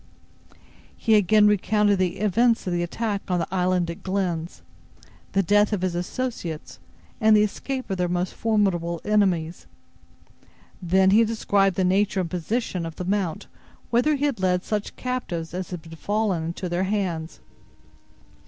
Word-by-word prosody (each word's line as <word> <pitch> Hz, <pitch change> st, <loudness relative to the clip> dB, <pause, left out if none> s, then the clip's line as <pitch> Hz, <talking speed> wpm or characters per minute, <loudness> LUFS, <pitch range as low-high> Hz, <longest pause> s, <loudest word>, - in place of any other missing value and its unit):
He 225 Hz, -, +1 dB
again 210 Hz, +1 st, +5 dB
recounted 210 Hz, 0 st, +3 dB
the 180 Hz, -2 st, 0 dB
events 230 Hz, +3 st, +2 dB
of 180 Hz, -, -1 dB
the 175 Hz, -, 0 dB
attack 200 Hz, +3 st, -2 dB
on 180 Hz, -, +1 dB
the 170 Hz, -, -1 dB
island 180 Hz, -1 st, +1 dB
at 170 Hz, -, -10 dB
Glenn's, 180 Hz, -4 st, -3 dB, 0.7 s
the 195 Hz, -1 st, +3 dB
death 205 Hz, +3 st, +3 dB
of 190 Hz, -3 st, -1 dB
his 185 Hz, -2 st, 0 dB
associates 175 Hz, -3 st, -4 dB, 0.4 s
and 215 Hz, -1 st, +6 dB
the 210 Hz, -, +5 dB
escape 260 Hz, +5 st, -3 dB
of 190 Hz, -, -3 dB
their 180 Hz, 0 st, 0 dB
most 175 Hz, +1 st, -1 dB
formidable 190 Hz, -6 st, 0 dB
enemies. 185 Hz, -6 st, +1 dB, 1.1 s
Then 190 Hz, +2 st, +3 dB
he 220 Hz, +3 st, +6 dB
described 200 Hz, -4 st, +1 dB
the 190 Hz, -, +1 dB
nature 195 Hz, +1 st, +2 dB
and 170 Hz, -, -5 dB
position 185 Hz, +1 st, -2 dB
of 165 Hz, -1 st, -6 dB
the 180 Hz, -, -5 dB
mount 190 Hz, -4 st, -1 dB, 0.5 s
whither 250 Hz, +6 st, +3 dB
he 285 Hz, +1 st, -1 dB
had 280 Hz, -8 st, -1 dB
led 180 Hz, -1 st, +1 dB
such 210 Hz, -1 st, -3 dB
captives 180 Hz, -11 st, -4 dB
as 180 Hz, 0 st, -4 dB
had 165 Hz, -2 st, -8 dB
fallen 205 Hz, -6 st, 0 dB
into 170 Hz, +2 st, -4 dB
their 175 Hz, +2 st, -1 dB
hands. 185 Hz, -5 st, -2 dB
190 Hz, 155 wpm, -24 LUFS, 175-210 Hz, 1.1 s, and